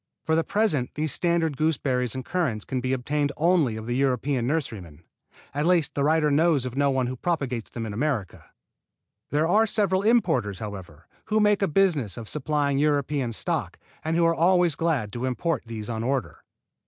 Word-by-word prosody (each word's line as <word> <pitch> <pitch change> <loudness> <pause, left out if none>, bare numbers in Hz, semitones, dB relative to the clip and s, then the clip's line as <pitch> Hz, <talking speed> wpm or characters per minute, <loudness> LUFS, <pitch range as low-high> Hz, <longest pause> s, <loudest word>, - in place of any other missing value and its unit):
For 160 - +1
the 165 - +2
present 195 - 0
these 155 -1 -1
standard 170 -3 +1
gooseberries 130 -6 0
and 130 -1 -5
currants 140 - -1
can 130 -1 -3
be 130 +1 -2
obtained 140 +3 0
only 160 -9 +2
of 110 - -7
the 120 +1 -2
European 130 -1 0
nurserymen. 110 - -4 0.5
At 145 +3 0
least 175 -4 +2
the 140 - -1
writer 155 0 +3
knows 150 -2 +3
of 125 -1 -5
no 140 0 +2
one 130 -2 +1
who 125 +1 -3
propagates 130 -6 -2
them 115 -1 -5
in 105 - -5
America. 120 -5 -2 0.8
There 150 +2 +1
are 215 +6 +4
several 195 -3 +1
importers, 160 - +2
however, 95 -6 -8 0.2
who 215 0 +1
make 210 -1 +3
a 195 - +3
business 150 - +1
of 115 -2 -7
supplying 145 -1 0
European 145 -3 +1
stock 110 - -3 0.3
and 160 +1 -1
who 170 0 +3
are 165 - +4
always 175 0 +3
glad 145 -12 -1
to 120 +1 -3
import 140 +3 -1
these 110 -2 -6
on 115 -1 -3
order. 130 +1 -2
145 Hz, 185 wpm, -25 LUFS, 125-165 Hz, 0.8 s, are